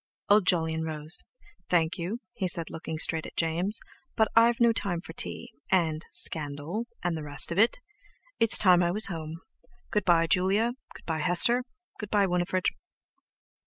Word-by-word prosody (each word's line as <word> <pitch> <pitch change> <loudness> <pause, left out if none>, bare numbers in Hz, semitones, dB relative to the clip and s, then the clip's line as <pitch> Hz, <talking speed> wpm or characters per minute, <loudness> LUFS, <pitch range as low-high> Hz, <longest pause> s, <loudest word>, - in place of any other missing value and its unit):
Old 205 -2 +4
Jolyon 160 -2 +1
rose: 155 0 -4 0.5
"Thank 170 0 +1
you," 200 +8 -4
he 195 -6 -3
said, 170 -2 0
looking 160 0 -6
straight 160 0 +2
at - - -14
James, 175 +6 +1 0.4
"but 220 - +2
I've 230 +1 +4
no 235 -1 +4
time 185 -6 -3
for 165 - -11
tea, 240 +7 -4 0.2
and—scandal, 160 +1 -1 0.2
and 175 -1 -1
the 160 - -5
rest 145 +1 +3
of 170 - -1
it! 225 - +3 0.6
It's 225 -1 +7
time 180 -3 +4
I 175 - +1
was 200 +2 +2
at - - -3
home. 160 +1 -7 0.5
Good 210 -2 0
bye, 170 -2 +3
Julia; 195 +7 +1 0.2
good - - -14
bye, 160 -1 -3
Hester; 210 +9 +2 0.3
good 210 - -7
bye, 205 -2 +2
Winifred." 180 0 -1
175 Hz, 165 wpm, -27 LUFS, 160-210 Hz, 0.6 s, It's